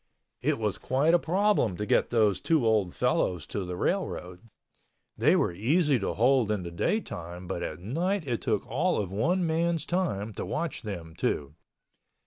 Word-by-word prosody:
It - - +1
was 105 -3 -2
quite 140 +6 +2
a 175 - +6
problem 180 - +1
to 105 - -2
get - - +2
those 110 -5 +3
two 160 -7 +2
old 105 -5 +2
fellows 90 -5 0
to 100 - -4
the 90 0 -4
railroad. 90 +4 -3 0.7
They - - +4
were - - +1
easy 140 - +2
to 100 - -2
hold 125 -1 +3
in 105 -4 -1
the 85 - -6
daytime 85 - -3
but 90 -1 -4
at 80 - -4
night 165 - -1
it 120 -3 -1
took 110 -5 0
all 175 +6 0
of 95 -3 -3
one 175 - +1
man's 165 -1 0
time 115 - -1
to - - -5
watch 170 -2 -3
them 85 -7 -6
two. 70 0 -1
110 Hz, 175 wpm, -28 LUFS, -, 0.7 s, a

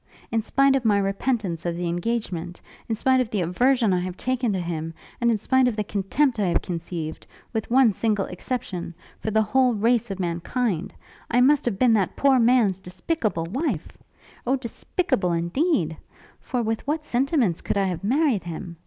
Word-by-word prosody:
In 225 0 +1
spite 275 +4 +3
of 265 - 0
my 210 -3 +3
repentance 195 -3 -1
of 170 -1 -2
the 175 0 -2
engagement, 175 -2 -3 0.3
in 225 - +1
spite 260 +3 +3
of 245 - -2
the 210 -4 -1
aversion 230 +5 +2
I 180 - +2
have 180 0 -4
taken 255 -2 0
to 190 - -1
him, 165 -2 -4 0.3
and 235 - +3
in 225 - +3
spite 260 +5 +2
of 240 - 0
the 210 - -1
contempt 215 +6 0
I 200 - +2
have 170 - +1
conceived 170 -2 -5 0.3
with 220 -2 -2
one 245 -3 +5
single 210 -2 0
exception 180 -4 -5 0.2
for - - -3
the 220 0 +3
whole 250 +2 +2
race 230 +2 +2
of 195 -1 -5
mankind, 175 +2 -1 0.4
I 245 - +3
must 275 +3 +4
have 230 -6 -1
been 240 +1 +4
that 200 -4 +1
poor 275 -2 +4
man's 230 -6 +3
despicable 185 - -2
wife! 235 - -3 0.5
O 260 - +3
despicable 235 - -1
indeed! 170 - 0 0.4
For 250 -3 -2
with 225 +4 -2
what 305 +1 -1
sentiments 250 - +1
could - - -2
I 200 - +3
have 185 -1 -3
married 255 - +1
him? 170 0 -7
215 Hz, 185 wpm, -24 LUFS, 180-255 Hz, 0.5 s, one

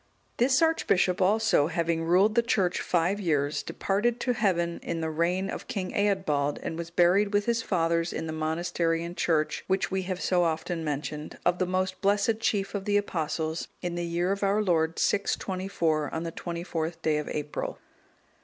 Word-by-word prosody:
This 260 +5 +3
archbishop 190 - +2
also, 205 -5 +3
having 165 -1 0
ruled 185 +6 +4
the 235 - +4
church 195 -6 +1
five 180 +3 +1
years, 150 -6 0
departed 220 +5 -1
to 250 - +1
heaven 175 -6 0
in 170 - -3
the 160 -1 -2
reign 175 +4 0
of - - -6
King 185 -2 -3
Eadbald, 185 -9 +1
and - - -3
was 165 0 -5
buried 180 +4 +3
with 205 0 +2
his 235 -1 +1
fathers 170 -4 0
in - - -4
the 160 - -4
monastery 165 +1 -1
and 170 +1 -6
church, 155 -3 0
which 190 0 0
we 190 0 0
have 185 0 -4
so 180 -1 +2
often 165 0 -1
mentioned, 150 0 -4
of 175 0 +2
the 185 - +1
most 185 0 -1
blessed 205 +2 +2
chief 205 -3 0
of 200 -2 -3
the 205 0 +3
Apostles, 160 -4 -2 0.2
in 175 -1 -2
the 175 0 -2
year 170 +2 0
of 200 - -2
our 200 +2 +2
Lord 165 -3 +1
624, 185 -6 0
on 160 - -3
the 165 - -4
24th 170 -1 -4
day 155 -1 +2
of 150 - -5
April. 150 0 -4
175 Hz, 180 wpm, -28 LUFS, 165-195 Hz, 0.2 s, ruled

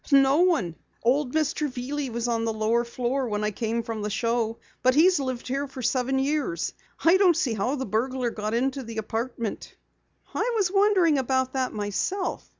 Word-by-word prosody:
"No 275 0 +6
one. 325 - +2 0.3
Old 255 +2 +2
Mr. 305 -1 0
Veely 270 +2 -3
was 235 +1 -2
on 230 -1 0
the 225 - 0
lower 220 +2 +1
floor 250 +2 -2
when 210 -1 -2
I 210 - 0
came 230 +2 -2
from 225 -2 -4
the 210 - -2
show, 230 +1 0 0.2
but 255 0 +3
he's 355 +2 +5
lived 260 -3 -3
here 275 +3 -1
for 265 -1 -8
seven 255 +2 +1
years. 270 - -1 0.3
I 335 +3 +7
don't 365 -4 +4
see 270 -9 +1
how 225 +6 0
the 265 -2 -3
burglar 245 +3 -1
got 215 +1 -3
into 265 +3 0
the 230 -2 -8
apartment." 225 +1 -4 0.6
"I - - 0
was 395 -5 +1
wondering 385 -7 +4
about 260 0 0
that 260 -2 0
myself. 210 - -2
255 Hz, 185 wpm, -26 LUFS, 230-285 Hz, 0.6 s, I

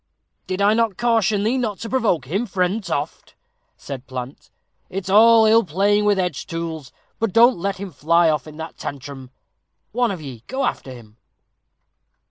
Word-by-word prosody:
"Did 185 +1 -1
I 205 +1 +5
not 225 -4 0
caution 225 -4 +1
thee 240 +5 +1
not 215 -5 -2
to 230 - -4
provoke 225 - +1
him, 195 - -2
friend 185 +3 -1
Toft?" - - -5 0.4
said 135 -2 -8
Plant; 130 +1 -7 0.4
"it's 190 0 -5
ill 225 +2 +6
playing 200 +5 +1
with 205 -1 +3
edge 180 -6 -2
tools; 165 -4 -5 0.3
but 225 -3 0
don't 235 -1 +5
let 195 +2 -2
him 195 -1 -7
fly 165 +4 +2
off 155 -2 0
in 155 0 -11
that 160 0 -8
tantrum 135 -1 -7 0.6
one 245 +1 +1
of 190 - -4
ye 130 -7 -9
go 265 +1 -2
after 135 - -3
him." 115 -3 -13
190 Hz, 165 wpm, -21 LUFS, 150-220 Hz, 0.6 s, ill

